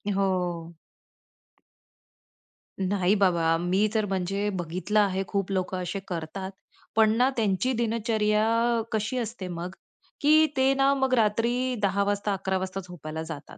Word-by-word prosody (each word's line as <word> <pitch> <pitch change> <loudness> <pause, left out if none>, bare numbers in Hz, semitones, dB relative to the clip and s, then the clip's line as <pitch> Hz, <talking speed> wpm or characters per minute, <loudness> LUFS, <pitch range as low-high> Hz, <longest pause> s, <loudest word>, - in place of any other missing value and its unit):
हो. 175 -4 -1 2.0
नाही 190 0 +2
बाबा, 170 -5 +3
मी 185 +5 +1
तर 220 -2 +1
म्हणजे 195 +1 -1
बघितलं 185 +4 -1
आहे 195 -2 +2
खूप 195 -1 -2
लोकं 185 -1 -1
असे 190 +3 -3
करतात 180 +3 -5 0.4
पण 220 -1 +5
ना, 250 +2 +4
त्यांची 220 +3 +1
दिनचर्या 225 0 +1
कशी 220 +3 -1
असते 225 -5 -4
मग, 175 0 -5 0.5
की 310 +2 +6
ते 265 +1 +4
ना 275 0 +3
मग 265 -1 0
रात्री 240 +3 +1
10:00 200 0 +2
वाजता, 205 0 0
11:00 190 0 -1
वाजता 190 0 -4
झोपायला 160 -2 -6
जातात 160 -2 -9
200 Hz, 135 wpm, -26 LUFS, 185-225 Hz, 2.0 s, की